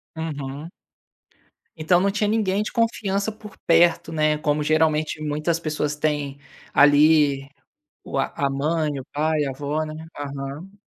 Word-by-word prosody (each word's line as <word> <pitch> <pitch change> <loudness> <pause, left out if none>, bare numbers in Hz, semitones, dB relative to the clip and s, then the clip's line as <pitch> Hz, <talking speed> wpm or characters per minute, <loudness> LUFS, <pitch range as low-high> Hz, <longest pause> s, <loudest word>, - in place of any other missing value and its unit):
Uhum. 150 -1 -5 1.1
Então 160 +3 +3
não 200 +2 +2
tinha 210 +1 0
ninguém 210 -2 +1
de 215 - -4
confiança 220 -3 0
por 210 -1 -13
perto, 170 0 +4
né, 155 -1 +1
como 150 0 0
geralmente 155 0 +1
muitas 155 +3 -1
pessoas 150 -2 -2
têm 145 -2 -2 0.3
ali, 145 -1 +5 0.6
o - - -4
a - - -1
a 140 -1 0
mãe, 150 +1 -1
o 130 - -7
pai, 155 0 +1
a 135 - -2
avó 145 +3 -2
né? 155 0 -7 0.2
Aham. 145 +7 -7
155 Hz, 145 wpm, -23 LUFS, 145-170 Hz, 1.1 s, ali